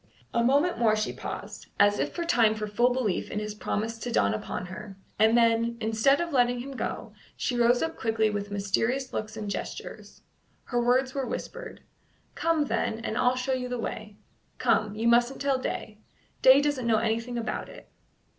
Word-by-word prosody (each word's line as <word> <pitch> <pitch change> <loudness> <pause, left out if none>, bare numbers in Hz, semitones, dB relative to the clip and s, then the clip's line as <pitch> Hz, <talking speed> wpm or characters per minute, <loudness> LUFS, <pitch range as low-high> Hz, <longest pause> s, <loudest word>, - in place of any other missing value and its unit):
A 235 - +2
moment 285 +4 +2
more 220 -2 +4
she 215 0 -2
paused, - - -7
as 205 0 +4
if - - -1
for 345 - -3
time 225 -8 +3
for 215 0 -3
full 235 +4 +2
belief 245 -7 -1
in - - -5
his 210 0 -3
promise 220 +2 -3
to 240 +2 -4
dawn 100 - +2
upon 180 +10 -4
her, 195 +1 -9 0.2
and 220 +2 +5
then, 230 0 +2
instead 225 +5 +2
of 340 -2 -3
letting 245 -1 +3
him 275 +3 -7
go, 265 - -5 0.2
she 250 - -1
rose 240 +1 +3
up 325 0 -2
quickly 220 -1 +1
with 205 -1 -3
mysterious 225 +6 -1
looks 215 0 -4
and 210 - -5
gestures. - - -7 0.4
Her 245 -1 -1
words 255 +2 +2
were 270 -2 -2
whispered: - - -6 0.5
"Come, 330 -3 +1
then, 230 -3 -1
and 220 - -3
I'll 250 +1 +3
show 255 +1 -1
you 250 -1 -2
the 245 - -2
way. 215 -2 -6 0.4
Come; 210 -1 +1
you 225 +2 -1
mustn't 240 +3 +3
tell 275 -1 +1
Day. 215 -4 -5 0.4
Day 265 +2 +8
doesn't 285 -5 -1
know 225 -1 +4
anything 230 +2 -1
about 230 -1 -3
it." - - -13
235 Hz, 190 wpm, -27 LUFS, 215-255 Hz, 0.5 s, Day